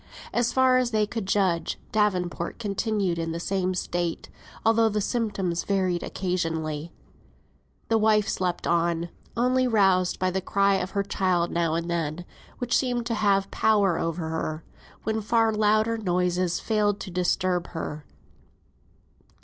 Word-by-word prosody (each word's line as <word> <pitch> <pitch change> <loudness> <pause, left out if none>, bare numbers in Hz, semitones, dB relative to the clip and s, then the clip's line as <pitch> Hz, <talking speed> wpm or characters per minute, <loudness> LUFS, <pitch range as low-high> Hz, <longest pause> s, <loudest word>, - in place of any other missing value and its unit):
As 240 0 +1
far 260 -1 +4
as 250 -1 +1
they 215 -2 +2
could 215 -2 -5
judge, 190 -4 +1
Davenport 185 -5 0
continued 200 -4 -1
in 165 0 -2
the 165 - -4
same 185 +1 -1
state, 175 -2 -2 0.4
although 225 0 +4
the 210 0 -1
symptoms 200 -6 -1
varied 185 -3 0
occasionally. 165 -4 -2 1.0
The 225 -1 +2
wife 215 -1 +3
slept 180 -2 -2
on, 170 0 +1 0.3
only 255 +2 +2
roused 190 -5 +3
by 185 - +1
a 190 +1 -2
cry 200 +1 +2
of 185 - -3
her 200 - +2
child 185 -3 0
now 170 -2 0
and 170 0 -2
then, 170 0 -2 0.3
which 245 -1 0
seemed 245 -3 0
to 235 - -1
have 200 -3 +1
power 200 -5 +2
over 165 -1 -2
her, 160 0 -3 0.4
when 220 0 -1
far 225 +1 +2
louder 215 +2 +2
noises 180 -2 0
failed 210 -2 +1
to 190 - -6
disturb 180 0 0
her. 155 -3 -5
190 Hz, 145 wpm, -26 LUFS, 175-215 Hz, 1.0 s, far